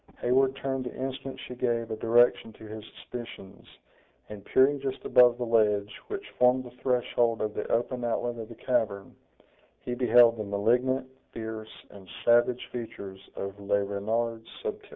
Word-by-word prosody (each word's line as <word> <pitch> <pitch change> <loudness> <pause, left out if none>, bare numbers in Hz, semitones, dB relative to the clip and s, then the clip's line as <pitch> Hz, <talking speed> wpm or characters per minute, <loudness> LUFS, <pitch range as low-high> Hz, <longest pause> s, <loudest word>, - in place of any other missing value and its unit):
Heyward 130 +2 +2
turned 135 -1 -3
the 125 - -6
instant 135 0 -5
she 125 - -8
gave 120 -2 -1
a - - -1
direction 115 +1 +3
to - - -15
his 110 0 -8
suspicions, 115 -5 -9 0.6
and 105 -2 -9
peering 140 +5 +3
just 135 -1 -5
above 120 -1 +6
the 120 - -2
ledge 105 -3 +2
which 405 0 -6
formed 125 +1 +4
the 125 - -11
threshold 120 -2 +1
of 105 -1 -2
the - - -4
open 120 +1 0
outlet 120 0 -1
of 110 0 -7
the 115 - -10
cavern, 105 -6 -1 0.7
he 125 - -4
beheld 120 -1 +5
the 110 - -3
malignant, 125 +6 +1 0.3
fierce 110 -1 -7
and 95 -2 -14 0.2
savage 120 +1 +3
features 100 -5 -7 0.2
of 100 +1 -6
Le 100 0 +1
Renard 110 +3 -2 0.2
Subtil. - - -5
120 Hz, 160 wpm, -28 LUFS, 110-125 Hz, 0.7 s, above